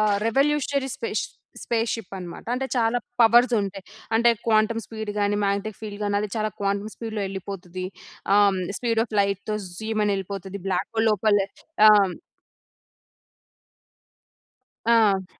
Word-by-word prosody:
ఆహ్, 210 -1 +3
revolutionary 280 +2 +1
space 455 -2 -2 0.4
spaceship 225 -4 -2
అన్నమాట. 175 -2 -8
అంటే 265 +1 -2
చాలా 235 0 +2 0.2
పవర్స్ 240 +2 +6
ఉంటాయి. 195 -1 -5 0.3
అంటే 235 +1 +5 0.2
క్వాంటం 220 +1 +3
స్పీడ్ 220 -2 -5
గాని, 205 0 +1
మాగ్నెటిక్ 200 +1 -1
ఫీల్డ్ 210 -1 -7
గాని 205 0 0
అది 210 - -2
చాలా 215 0 0
క్వాంటం 200 +1 -1
స్పీడ్‌లో 220 -2 -5
యెళ్ళిపోతది. 185 -1 -6 0.5
ఆహ్, 205 - +6
హ్మ్ 190 -1 -1 0.2
స్పీడ్ 230 -2 +1
ఆఫ్ 220 - -10
లైట్‌తో 200 +2 -1 0.2
జూయ్‌మని 215 -2 0
ఎళ్ళిపోతది. 195 0 -6
బ్లాక్ 185 +1 -1
హోల్ 225 0 +2
లోపల 210 0 +3 0.5
ఆం 200 -3 +6 2.8
ఆ! 205 -5 +2
210 Hz, 130 wpm, -24 LUFS, 200-225 Hz, 2.8 s, పవర్స్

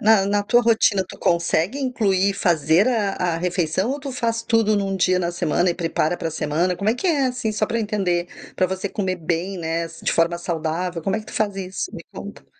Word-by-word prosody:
na 215 -2 +5
na 205 0 +2
tua 240 +4 +3
rotina, 220 -4 +3
tu - - -11
consegue 170 - +1
incluir, 200 -7 +1
fazer 170 0 +3
a 210 -6 0 0.2
a - - -1
refeição 180 +4 0
ou 285 - -2
tu 275 -1 -5
faz 230 -2 -1
tudo 225 -2 +2
num 195 -1 -1
dia 185 0 +3
na 175 -1 -1
semana 175 +1 +1
e - - -2
prepara 165 0 0
pra 165 - -3
semana? 160 +4 0
Como 200 +3 -1
é 220 - +3
que 370 - -3
é, 285 -5 +2
assim? 250 -3 -2
Só 215 0 0
pra 230 - -2
eu - - 0
entender. 180 -5 -1 0.3
Pra 185 - +2
você 190 +2 -3
comer 185 -1 -2
bem, 175 +3 -2
né, 165 0 -2
de 165 +1 -3
forma 170 +1 +2
saudável, 170 +1 -2
como 195 +5 0
é 220 - -3
que 215 - -15
tu - - -10
faz 205 -2 -1
isso? 190 - -4
Me - - -8
conta. - - -9
190 Hz, 230 wpm, -22 LUFS, 170-215 Hz, 0.3 s, na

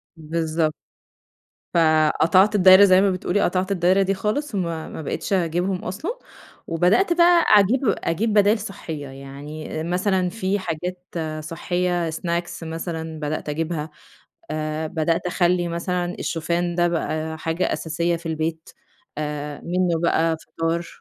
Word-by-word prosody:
بالضبط. 160 0 -1 1.0
فقطعت 165 +5 +4
الدايرة 190 0 +8
زي 185 -1 +6
ما 200 -1 +3
بتقولي، 185 +2 -1
قطعت 185 +2 0
الدايرة 185 +1 +3
دي 195 0 +1
خالص 215 +6 -2
وما 170 -4 -2
ما - - -7
بقِتش 155 - -3
أجيبهم 180 +1 0
أصلًا، 325 - -4 0.5
وبدأت 180 - +3
بقى 345 0 +5
أجيب 210 +4 +5
أجيب 205 +2 0
بدايل 210 +1 +4
صحية، 160 -8 -6
يعني 140 +4 -7
مثلًا 180 +1 0
في 195 0 -1
حاجات 180 +1 -4 0.5
صحية 175 0 -1
سناكس 170 +1 -3
مثلًا 160 -1 -5
بدأت 150 0 -3
أجيبها 160 0 -3 0.6
آآ، 155 0 -2
بدأت 165 +2 -1
أخَلّي 175 -1 +1
مثلًا 175 +1 -2
الشوفان 170 +1 -1
ده 175 0 +2
بقى 160 -1 -2
حاجة 165 +3 -1
أساسية 170 +2 -1
في 165 - -11
البيت 160 0 -3 0.5
آآ، 150 -1 -4
منه 175 -1 0
بقى 165 -1 +2
فطار، 165 +1 -3
170 Hz, 130 wpm, -23 LUFS, 160-185 Hz, 1.0 s, الدايرة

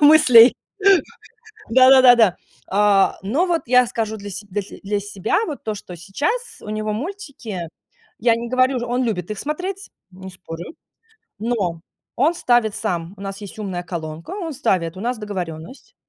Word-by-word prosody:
мыслей. 265 -6 +8 1.2
Да 255 +2 +7
да 265 -1 +8
да 245 -1 +9
да. 210 -7 +4 0.4
Э, 200 -1 +3
но 250 - +1
вот 340 -2 0
я 250 +1 +5
скажу 220 -2 -3
для 205 -1 -8
се 200 +2 -8
для 205 +2 -2
те 195 - -13
для 205 +1 -1
себя, 205 0 -1
вот, 300 -4 -6
то, 215 - -2
что 190 -3 -10
сейчас 290 - -3
у 210 - -7
него 215 0 -2
мультики 260 - -6 0.5
Я 230 +1 +3
не 235 +1 -5
говорю, 255 +1 +2
он 250 +1 0
любит 200 -6 -3
их 210 - -4
смотреть, 365 - -5 0.2
не 190 0 -10
спорю. 175 - -9 0.7
Но, 205 -7 -1 0.4
он 295 +7 +3
ставит 240 -8 +2
сам. 175 -4 -3
У - - -12
нас 195 0 -6
есть 205 0 -9
умная 185 -4 -4
колонка. 165 -2 -7
Он 370 -5 -4
ставит, 185 - -1
у - - -7
нас 245 +1 -2
договоренность. 180 - -7
215 Hz, 170 wpm, -21 LUFS, 190-255 Hz, 1.2 s, да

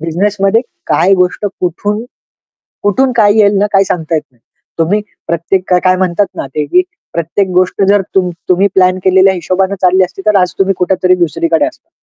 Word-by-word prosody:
बिझनेसमध्ये 195 +6 0 0.3
काय 175 +5 +2
गोष्ट 180 +2 0 0.2
कुठून, 205 +5 -2 0.8
कुठून 250 +6 +1
काय 210 -3 +4
येईल 205 -1 +4
ना 205 - +2
काही 195 0 +4
सांगता 165 -3 -3
येत 155 - 0
नाही. 120 - -33 0.4
तुम्ही 180 +6 +1 0.3
प्रत्येक 170 +3 -1
का 180 - +4
काय 185 0 +3
म्हणतात 185 +2 0
ना, - - -4
ते 150 +3 -3
की 365 - +3 0.3
प्रत्येक 170 +4 -1
गोष्ट 185 +2 +1
जर 205 -1 +3
तुम 185 -2 +1 0.2
तुम्ही 185 +2 +3
प्लॅन 185 0 +3
केलेल्या 190 +1 +4
हिशोबाने 185 +2 -1
चालली 185 +1 +4
असती 190 +1 -9
तर 215 - +3
आज 180 - 0
तुम्ही 195 0 +2
कुठेतरी 185 0 +2
दुसरीकडे 165 -1 0
असता. 325 +1 -10
185 Hz, 180 wpm, -12 LUFS, 175-200 Hz, 0.8 s, काय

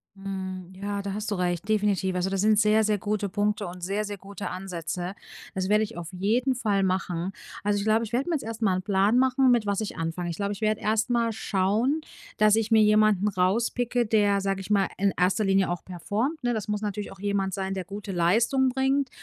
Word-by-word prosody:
Mhm. 190 -2 -6
Ja, 200 +1 -4
da 200 -1 -4
hast 210 +1 -4
du - - +1
recht, 180 +1 -2
definitiv. 200 -3 +1
Also 180 +1 0
das 195 -1 -1
sind 215 0 +4
sehr, 215 +1 +4
sehr 210 -1 +2
gute 205 0 -2
Punkte 205 +1 0
und 180 +1 -9
sehr, 200 +4 -1
sehr 205 -1 -5
gute 200 +1 -7
Ansätze. 180 -1 -4 0.4
Das 190 0 -1
werde 210 +1 +4
ich 230 - -11
auf 170 -1 -6
jeden 225 +8 +1
Fall 205 -5 +1
machen. 185 -1 -1 0.3
Also, 205 0 +1
ich 200 - -3
glaube, 220 +1 +3
ich 225 - -6
werde 255 +5 0
mir 335 - +1
jetzt 280 - -3
erst 225 0 -6
mal 195 -4 +3
'n 185 - -1
Plan 200 +3 +2
machen, 260 0 +4
mit 235 -3 +3
was 200 -1 0
ich 215 -4 -4
anfange. 165 +1 -3
Ich 170 - -3
glaube, 200 +2 -2
ich 200 - -9
werd 215 0 +2
erst 220 +2 0
mal 235 -1 +1
schauen, 220 +8 0 0.4
dass 215 0 +5
ich 225 0 -1
mir 220 -1 +6
jemanden 210 -2 +4
rauspicke, 235 +6 +1
der- 205 -2 +2
sage 195 0 -1
ich 190 - -8
mal- 200 -2 +3
in 195 +1 +1
erster 185 +4 +2
Linie 195 -1 +3
auch 175 0 -4
performt, 220 - -3
ne, 245 0 +1
das 215 -4 -3
muss 210 -1 -2
natürlich 210 -1 -4
auch 190 - -18
jemand 200 -1 -1
sein, 190 +1 -2
der 190 -2 -4
gute 200 +2 -7
Leistung 230 +10 +2
bringt 265 +1 +1
205 Hz, 230 wpm, -26 LUFS, 190-220 Hz, 0.4 s, mir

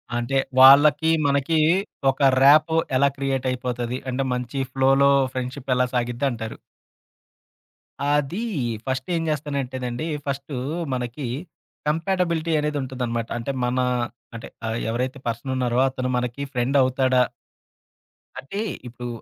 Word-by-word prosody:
అంటే 120 +3 -2 0.2
వాళ్ళకి, 145 +4 +7 0.2
మనకి 140 +3 +1 0.5
ఒక 135 0 +3
ర్యాపో 155 +3 +6 0.2
ఎలా 140 +1 +4
క్రియేట్ 135 -1 -1
అయిపోతది? 125 -1 -3
అంటే 135 +2 -1
మంచి 125 +2 -3
ఫ్లోలో 135 +1 +4 0.2
ఫ్రెండ్‌షిప్ 130 +1 -4
ఎలా 125 0 +3
సాగిద్ది 120 +3 0
అంటారు? 115 -1 -6 1.5
అది 145 +7 0 0.4
ఫస్ట్ 130 0 -2
ఏం 165 - 0
జేస్తానంటేనండి. 135 -2 -3 0.2
ఫస్టూ 140 0 -4 0.4
మనకి 125 +2 -4 0.6
కంపాటబిలిటీ 165 0 0
అనేది 150 0 -1
ఉంటదనమాట. 125 -3 -3
అంటే 120 +4 -3
మన 125 +1 -1 0.6
అంటే 115 - -7 0.2
ఆహ్, 110 +1 -2
ఎవరైతే 125 +4 -2
పర్సనున్నారో 120 +1 -1
అతను 130 -1 -3
మనకి 125 +3 -3
ఫ్రెండవుతాడా 130 0 +2 1.2
అంటే 200 +10 -5 0.3
ఇప్పుడు 120 +1 -7
130 Hz, 110 wpm, -23 LUFS, 125-140 Hz, 1.5 s, వాళ్ళకి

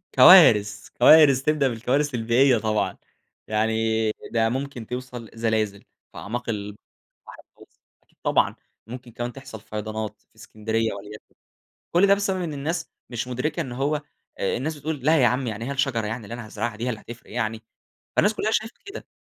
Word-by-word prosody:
كوارث، 105 0 +7
كوارث 140 0 +6
تبدأ 150 -1 +2
بالكوارث 130 +5 0
البيئية 120 +3 +3
طبعًا، 110 -1 -1 0.5
يعني 110 0 +1 0.2
ده 115 -1 +2
ممكن 130 -3 -5
توصل 125 -2 -7
زلازل 110 -3 -1 0.3
في - - -14
أعماق 120 +3 -5
البحر 105 -1 -4 0.8
المتوسط - - -20 0.2
أكيد - - -36
طبعًا، - - +2 0.3
ممكن 125 0 -9
كمان 120 +1 -5
تحصل 130 -6 -10
فيضانات 110 0 -5
في - - -40
اسكندرية 110 +1 -2
وليكن، 105 +1 -11 0.6
كل 180 +4 +5
ده 200 - +6
بسبب 195 -2 -1
إن 165 -3 -3
الناس 160 +4 -3 0.2
مش 120 0 -4
مدركة 150 +7 -2
إن 130 - -6
هو 145 +4 -1 0.4
الناس 155 +5 -2
بتقول: 150 0 -4
"لا 160 -1 +4
يا - - +6
عم 125 +1 0
يعني 110 +1 -4
هي 135 - -4
الشجرة 135 -5 0
يعني 115 +1 -5
اللي 110 - -8
أنا 120 -1 -7
هازرعها 110 +1 -4
دي 115 +3 -4
هي - - -1
اللي 110 -3 -4
هتفرق 120 0 -12
يعني؟" 110 -1 -3 0.5
فالناس 205 +2 +3
كلها 215 0 -1
شايفة 220 +1 -1
كده، 400 +2 -9
120 Hz, 170 wpm, -24 LUFS, 110-140 Hz, 0.8 s, كوارث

